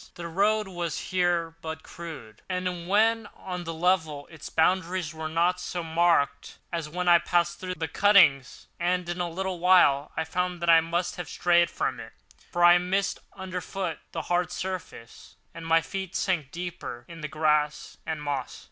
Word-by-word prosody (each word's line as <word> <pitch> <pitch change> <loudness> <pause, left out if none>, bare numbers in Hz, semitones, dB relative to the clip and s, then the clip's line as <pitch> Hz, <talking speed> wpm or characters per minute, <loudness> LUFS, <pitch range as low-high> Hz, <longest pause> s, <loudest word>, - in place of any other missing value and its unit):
The 170 -1 -6
road 205 +5 +1
was 175 -3 -3
here 175 -3 +1
but 160 0 -6
crude, 150 -11 -10
and 180 -2 -3
when 220 +2 +3
on 180 -2 -6
the 165 - -4
level 160 -4 +1
its 160 -3 -9
boundaries 175 0 +1
were 160 0 -5
not 175 +3 +1
so 175 -1 -4
marked, 160 -3 +1 0.2
as 165 -3 -3
when 180 +3 -3
it 170 -1 +6
passed 175 0 +1
through 185 -1 -4
the 160 - -3
cuttings; 170 -7 +4
and 180 0 0
in 175 +1 -3
a 175 - -1
little 185 +1 -3
while 165 -6 +4
I 160 - +1
found 180 +2 -2
that 170 - +5
I 165 0 +7
must 170 +2 -2
have 175 - -6
strayed 175 -1 +3
from - - -2
it, - - -10 0.4
for 175 -1 +1
I 175 0 +8
missed 195 +3 -1
underfoot 185 -2 -4
the 165 - -4
hard 175 0 0
surface, 185 -10 -7 0.2
and 165 -1 -8
my 165 0 +4
feet 190 +2 -6
sank 175 -8 0
deeper 170 -8 -6
in 165 -1 -10
the 150 - -3
grass 150 -1 0
and 155 -2 -4
moss. 140 -3 -3
175 Hz, 175 wpm, -27 LUFS, 160-180 Hz, 0.4 s, I